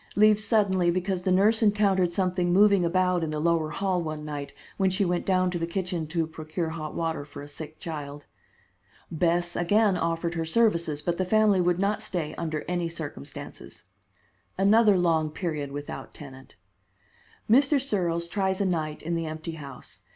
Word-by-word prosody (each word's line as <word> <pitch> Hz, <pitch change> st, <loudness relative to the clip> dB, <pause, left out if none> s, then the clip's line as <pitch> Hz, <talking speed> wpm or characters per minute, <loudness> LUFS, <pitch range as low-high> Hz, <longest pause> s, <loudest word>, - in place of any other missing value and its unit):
Leaves 215 Hz, 0 st, +5 dB
suddenly 200 Hz, -5 st, +2 dB
because 185 Hz, +1 st, -1 dB
the 185 Hz, -, 0 dB
nurse 210 Hz, +5 st, +4 dB
encountered 200 Hz, -4 st, +3 dB
something 180 Hz, -1 st, 0 dB
moving 200 Hz, 0 st, +5 dB
about 180 Hz, 0 st, +1 dB
in 160 Hz, -, -2 dB
the 155 Hz, 0 st, -3 dB
lower 165 Hz, -1 st, +1 dB
hall 190 Hz, +1 st, -1 dB
one 155 Hz, -2 st, -5 dB
night 145 Hz, -2 st, -5 dB, 0.3 s
when 195 Hz, -1 st, +2 dB
she 190 Hz, +2 st, +1 dB
went 175 Hz, -1 st, -1 dB
down 185 Hz, -1 st, +2 dB
to 175 Hz, -, -3 dB
the 165 Hz, -, -2 dB
kitchen 175 Hz, -2 st, -3 dB
to 165 Hz, +1 st, -1 dB
procure 160 Hz, +1 st, -4 dB
hot 155 Hz, -1 st, -6 dB
water 160 Hz, -3 st, -2 dB
for 145 Hz, 0 st, -10 dB
a -, -, -9 dB
sick 155 Hz, +1 st, -9 dB
child. 145 Hz, -3 st, -7 dB, 0.9 s
Bess 175 Hz, +1 st, 0 dB
again 205 Hz, +3 st, +3 dB
offered 165 Hz, 0 st, -1 dB
her 165 Hz, -1 st, -2 dB
services, 170 Hz, -5 st, +1 dB
but 175 Hz, -1 st, -1 dB
the 185 Hz, -, +1 dB
family 205 Hz, 0 st, +3 dB
would 175 Hz, 0 st, +2 dB
not 205 Hz, +2 st, 0 dB
stay 175 Hz, -8 st, -3 dB
under 155 Hz, -2 st, -4 dB
any 175 Hz, -1 st, -1 dB
circumstances. 150 Hz, -, -9 dB, 0.7 s
Another 205 Hz, +1 st, +5 dB
long 165 Hz, -3 st, +2 dB
period 150 Hz, -3 st, -4 dB
without 145 Hz, +1 st, -7 dB
tenant. 130 Hz, -3 st, -12 dB, 0.9 s
Mr. 275 Hz, +5 st, +4 dB
Searles 175 Hz, -10 st, -1 dB
tries 190 Hz, +1 st, -1 dB
a 200 Hz, -, +1 dB
night 155 Hz, -4 st, -2 dB
in 170 Hz, +2 st, -2 dB
the 165 Hz, -1 st, -2 dB
empty 155 Hz, +1 st, -5 dB
house. 140 Hz, -5 st, -9 dB
175 Hz, 175 wpm, -26 LUFS, 160-190 Hz, 0.9 s, Leaves